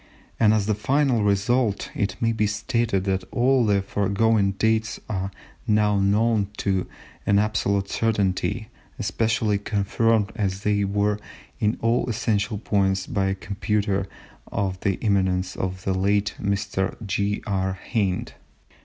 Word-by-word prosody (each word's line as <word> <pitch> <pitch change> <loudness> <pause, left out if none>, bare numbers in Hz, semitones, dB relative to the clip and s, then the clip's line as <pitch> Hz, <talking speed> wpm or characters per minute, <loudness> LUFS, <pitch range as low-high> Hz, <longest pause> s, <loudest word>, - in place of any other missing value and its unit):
And 110 -2 +5
as 110 -2 +2
the 110 - +1
final 130 +1 +1
result, 105 +2 +1
it 100 0 -1
may 115 0 +2
be 105 -2 +1
stated 105 -1 0
that 95 -1 0
all 130 +1 +3
the 100 -2 +2
foregoing 100 +1 +1
dates 110 +2 0
are 95 -2 -2 0.4
now 105 -1 +3
known 105 +1 +2
to 95 -2 0 0.4
an 100 - +4
absolute 100 -2 +1
certainty, 110 +1 0 0.3
especially 110 -2 0
confirmed 105 +1 +1
as 95 -2 -1
they 105 -1 +2
were 105 +1 0 0.4
in 105 0 +1
all 115 +2 +1
essential 105 -2 0
points 95 -2 +1
by 95 -1 0
a 95 - 0
computer 100 0 -1 0.4
of 95 -2 -1
the 95 -1 0
eminence 95 -3 +1
of 95 0 -4
the 95 - 0
late 100 +2 +1
Mr. 100 -1 -1
J. 100 +1 -1
R. 95 -2 0 0.2
Hind. 100 -5 0
100 Hz, 135 wpm, -24 LUFS, 95-110 Hz, 0.4 s, And